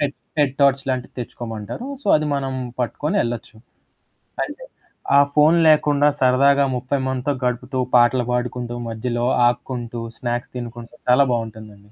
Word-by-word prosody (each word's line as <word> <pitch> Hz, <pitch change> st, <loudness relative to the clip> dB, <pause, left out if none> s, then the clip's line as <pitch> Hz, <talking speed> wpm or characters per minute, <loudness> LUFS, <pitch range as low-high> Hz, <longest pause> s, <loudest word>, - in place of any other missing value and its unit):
Head 145 Hz, -1 st, -1 dB, 0.2 s
head 140 Hz, -3 st, +3 dB
torch 140 Hz, -1 st, +5 dB
లాంటివి 130 Hz, -1 st, -3 dB
తెచ్చుకోమంటారు. 115 Hz, -, -6 dB, 0.2 s
So, -, -, -12 dB
అది 155 Hz, 0 st, -2 dB
మనం 135 Hz, -1 st, -2 dB, 0.3 s
పట్టుకొని 150 Hz, -, -1 dB
ఎళ్ళొచ్చు. 120 Hz, -1 st, -5 dB, 0.9 s
అంటే -, -, -8 dB, 0.5 s
ఆ -, -, +9 dB
ఫోను 155 Hz, +3 st, +5 dB
లేకుండా 150 Hz, -1 st, +4 dB
సరదాగా 140 Hz, +2 st, +4 dB
30 130 Hz, +2 st, -2 dB
మందితో 130 Hz, +2 st, -1 dB
గడుపుతూ, 125 Hz, +1 st, -2 dB, 0.2 s
పాటలు 120 Hz, +1 st, +4 dB
పాడుకుంటూ, 125 Hz, 0 st, -2 dB
మధ్యలో 120 Hz, +1 st, -2 dB, 0.2 s
ఆగుకుంటూ, 120 Hz, -1 st, -3 dB, 0.2 s
స్నాక్స్ 120 Hz, 0 st, -3 dB
తినుకుంటూ 120 Hz, +2 st, -8 dB
చాలా 135 Hz, +3 st, +6 dB
బావుంటుందండి. 110 Hz, -3 st, -6 dB
125 Hz, 130 wpm, -21 LUFS, 120-140 Hz, 0.9 s, ఆ